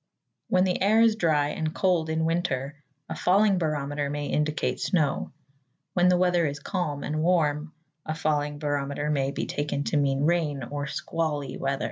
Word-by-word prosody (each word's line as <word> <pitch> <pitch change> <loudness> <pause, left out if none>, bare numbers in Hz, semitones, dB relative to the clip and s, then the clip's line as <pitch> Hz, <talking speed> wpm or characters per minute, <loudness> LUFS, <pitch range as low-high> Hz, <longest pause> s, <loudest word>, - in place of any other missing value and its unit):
When 185 0 +3
the 185 -1 0
air 210 +3 +4
is 225 -1 +5
dry 155 -7 +2
and 155 +1 -3
cold 175 -4 +1
in 160 0 0
winter 145 -4 -2 0.3
a - - -4
falling 195 +1 +3
barometer 145 -3 -1
may 145 0 -3
indicate 150 +2 -1
snow. 155 -7 0 0.6
When 180 0 +3
the 180 - +4
weather 175 -2 +2
is 140 0 -4
calm 150 -3 -3
and 155 +1 -2
warm, 155 -2 +1 0.3
a 155 - -3
falling 150 -2 -1
barometer 145 0 -2
may 135 -2 +1
be - - -3
taken 145 -1 -2
to - - 0
mean 140 -1 +1
rain 155 -4 +1
or 145 +3 -4
squally 150 -1 -3
weather. 135 0 -2
150 Hz, 170 wpm, -26 LUFS, 145-175 Hz, 0.6 s, is